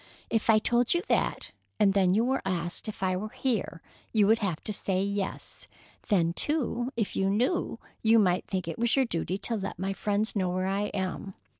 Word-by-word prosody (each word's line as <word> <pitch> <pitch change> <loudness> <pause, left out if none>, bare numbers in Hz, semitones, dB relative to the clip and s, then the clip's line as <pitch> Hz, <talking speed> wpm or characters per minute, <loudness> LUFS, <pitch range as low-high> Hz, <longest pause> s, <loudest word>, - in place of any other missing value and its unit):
"If 225 0 0
I 220 - +7
told 240 +5 +2
you 345 - 0
that, - - 0 0.3
and 200 -2 +4
then 190 -2 +3
you 225 +3 +3
were 265 +2 0
asked 175 +1 -2
if 210 -2 -6
I 185 -1 +1
were 210 +4 -4
here, 220 -9 -2 0.3
you 215 -3 +4
would 220 +3 +4
have 185 -7 -1
to 210 - -2
say 190 -1 0
yes. 200 -1 -4 0.4
Then, 170 -5 +2
too, 255 - 0
if 220 -4 -1
you 195 0 +1
knew, 245 - 0 0.2
you 225 +1 +5
might 185 -4 +2
think 185 -3 -3
it 165 - -5
was 235 -1 +2
your 270 -1 +3
duty 185 -3 -2
to 230 +3 -2
let 195 -3 -4
my 195 +2 -2
friends 210 +2 -1
know 185 -3 +1
where 185 +1 -1
I 195 +2 0
am. 190 -1 -4
200 Hz, 205 wpm, -28 LUFS, 185-225 Hz, 0.4 s, I